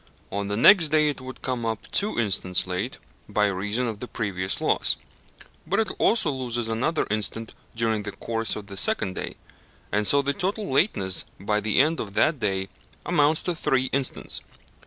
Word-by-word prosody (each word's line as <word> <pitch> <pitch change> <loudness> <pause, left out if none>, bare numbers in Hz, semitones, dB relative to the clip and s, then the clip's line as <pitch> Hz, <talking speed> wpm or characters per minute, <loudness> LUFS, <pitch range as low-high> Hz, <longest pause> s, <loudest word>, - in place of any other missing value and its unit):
On 100 +1 -2
the 105 +1 -2
next 165 - +7
day 155 0 +4
it 145 - -4
would 130 0 -9
come 125 -2 -2
up 115 -2 -3
two 210 +2 +1
instants 95 -4 +1
late 95 +7 -3 0.3
by 105 - +2
reason 105 +5 -1
of 110 -3 -4
the 125 - -6
previous 95 -5 -2
loss; - - +2 0.7
but - - +1
it 220 - +1
also 215 -9 +3
loses 120 -3 -2
another 130 +8 0
instant 110 +1 -2 0.2
during 110 -2 0
the 105 0 -5
course 115 +3 -2
of 105 - -6
the 100 -1 -9
second 95 0 +2
day, - - -5 0.6
and 105 0 +1
so 140 0 +4
the 140 +1 0
total 200 +6 -2
lateness 100 - +1 0.2
by 105 +2 0
the 105 +2 +1
end 155 +4 +3
of 100 -2 -5
that 155 -3 +3
day 95 -3 -1 0.4
amounts 155 -2 +3
to 180 - 0
three 130 -5 +1
instants. 135 -1 -1
115 Hz, 180 wpm, -25 LUFS, 100-140 Hz, 0.7 s, next